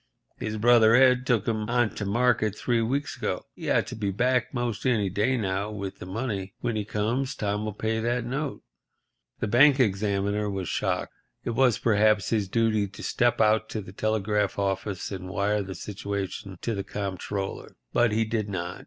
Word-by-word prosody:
His 110 0 -3
brother 115 0 +6
Ed 125 0 +5
took 115 -5 +2
'em 110 -1 -1
on 120 -2 +2
to 105 - -4
market 110 -1 +2
three 120 +1 0
weeks 135 +5 -1
ago. - - -3
He - - -6
ought - - +3
to - - -7
be 105 -2 -2
back 125 +4 +1
'most 120 -3 -2
any 105 -6 +2
day 105 +7 +1
now 100 -1 -1
with 100 -3 -6
the 90 - -8
money. 100 -2 -4
When 120 -2 -2
he 105 - -1
comes 120 +6 -1
Tom'll 105 +1 -2
pay 110 +2 -2
that 120 +1 -1
note." 135 +3 -3 0.8
The - - 0
bank 135 +6 +6
examiner 100 -1 +1
was 95 -3 -3
shocked. - - -1 0.3
It - - -2
was, 120 -1 +3
perhaps, 110 -3 +3
his 105 -4 +1
duty 110 0 +1
to 100 - -11
step 120 0 +1
out 110 0 +3
to 110 - -3
the 95 -1 -11
telegraph 105 -1 0
office 100 0 -2
and 95 -1 -6
wire 100 +2 0
the 95 -1 -6
situation 100 0 -5
to 115 - -1
the 100 -2 -3
Comptroller. 100 0 -4 0.2
But 120 -2 +3
he 110 +1 +1
did 110 -2 -2
not. 90 -2 -4
105 Hz, 185 wpm, -26 LUFS, 100-120 Hz, 0.8 s, brother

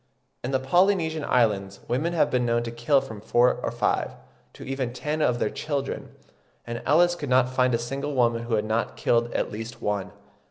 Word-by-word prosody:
In 125 - -2
the 135 -1 +1
Polynesian 160 +2 +2
Islands 100 -7 +1
women 155 +8 0
have 165 - +2
been 125 -1 +2
known 120 0 +1
to 115 - -5
kill 120 +4 +2
from 110 -6 -9
four 120 +3 +3
or - - -1
five, - - 0 0.4
to - - -11
even 130 -2 -3
ten 150 +4 -3
of 125 -5 +2
their - - -1
children; 140 -3 -3 0.6
and 120 0 -5
Ellis 175 +4 +5
could 145 -5 -5
not 130 0 +3
find 125 -2 +3
a - - +2
single 135 +5 -4
woman 115 -2 +2
who 115 -1 0
had 105 0 0
not 110 +2 -1
killed 120 0 +1
at - - -1
least 115 +2 -7
one. 105 -2 -2
125 Hz, 200 wpm, -25 LUFS, 115-140 Hz, 0.6 s, Ellis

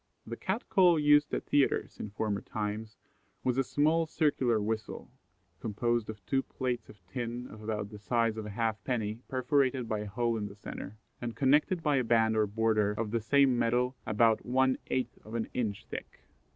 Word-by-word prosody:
The 115 - -5
Cat 190 - -3
call 180 -4 +5
used 150 0 +5
at - - -2
theatres 145 -2 +1
in 105 - -4
former 100 0 -2
times 110 +1 -4 0.5
was 125 -1 +1
a - - +4
small 155 +5 +2
circular 135 -8 +2
whistle, 110 0 -4 0.5
composed 120 +1 -1
of 105 -3 -8
two 135 +6 +1
plates 125 -3 -3
of 95 -4 -16
tin 120 +5 -4
of 110 - -11
about 105 -1 -3
the 105 - -9
size 115 +1 +1
of 110 -1 -5
a - - -6
half 110 0 -1
penny 110 -4 -2
perforated 130 -1 +1
by 110 -1 -1
a 105 - -4
hole 115 +3 0
in 105 -1 -3
the 100 - -11
centre, 100 0 -8 0.2
and 120 -1 -4
connected 150 +6 +3
by 150 -2 +3
a 130 - +2
band 115 -1 +3
or 110 -1 +3
border 110 -1 +1
of 105 0 -3
the 115 0 0
same 130 +2 +4
metal 120 +2 +1
about 110 0 +3
one 130 +1 +2
eighth 130 - -2
of 110 +2 -8
an 115 - -1
inch 110 -5 -2
thick. - - -8
115 Hz, 190 wpm, -31 LUFS, 110-130 Hz, 0.5 s, call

